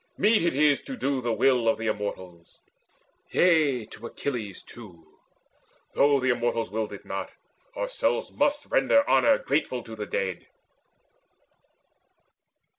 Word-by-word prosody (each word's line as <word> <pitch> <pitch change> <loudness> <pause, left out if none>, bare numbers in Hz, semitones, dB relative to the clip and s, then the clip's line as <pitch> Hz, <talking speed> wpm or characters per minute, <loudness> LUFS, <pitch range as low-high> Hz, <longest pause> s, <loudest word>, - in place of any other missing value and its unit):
Meet 215 +3 +4
it 170 -5 +1
is 145 0 +3
to 265 - -6
do 135 - -1
the 120 -1 -1
will 120 +1 +2
Of 115 - +3
the 115 - -5
Immortals: 95 -5 -5 0.7
yea, 150 -9 +3
to 110 +2 -10
Achilles 115 -10 -5
too, 90 -9 -15 0.7
Though 140 0 +4
the 130 0 +1
Immortals 120 -4 -1
willed 110 0 -3
it - - -10
not, - - -5 0.5
ourselves - - -1
Must 290 0 0
render 285 -13 +3
honour 285 -1 +4
grateful 135 -3 -1
to 115 - -9
the 105 -1 -6
dead." 95 -3 -3
125 Hz, 130 wpm, -26 LUFS, 110-155 Hz, 0.7 s, Meet